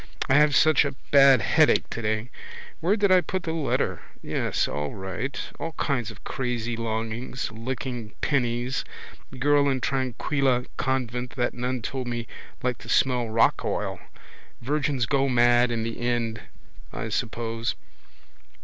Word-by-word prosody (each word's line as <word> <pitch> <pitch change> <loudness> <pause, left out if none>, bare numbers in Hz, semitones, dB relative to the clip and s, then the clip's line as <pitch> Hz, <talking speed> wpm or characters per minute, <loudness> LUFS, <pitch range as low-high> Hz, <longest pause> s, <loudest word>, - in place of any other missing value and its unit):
I - - +3
have 150 0 +5
such 155 -2 +5
a 140 -2 -3 0.2
bad 135 -3 +7
headache - - +4
today. 110 +1 -2 0.5
Where 180 +5 +2
did 200 -3 +2
I 185 -1 +7
put 185 0 -3
the 160 - -2
letter? 155 -4 -1 0.2
Yes, - - 0
all 75 0 -3
right. 95 +8 -4 0.2
All 165 - -4
kinds 125 -9 -1
of 110 -3 -12
crazy 120 -2 -2
longings. 115 +2 -3
Licking 120 -1 -5
pennies. 125 -2 0 0.5
Girl 145 +1 +3
in 135 -1 0
Tranquilla 130 0 0
convent 125 -2 -2
that 120 -2 0
nun 125 0 -3
told 130 +1 -3
me 120 -1 -3 0.4
liked 125 -1 -1
to - - -11
smell 125 -3 +2
rock 115 +1 +3
oil. - - -2 0.6
Virgins 140 -1 0
go 135 +2 +1
mad 120 0 +4
in 115 -1 -1
the 115 0 -4
end 120 -2 -1 0.5
I - - -4
suppose. 115 0 -2
125 Hz, 140 wpm, -26 LUFS, 115-135 Hz, 0.6 s, bad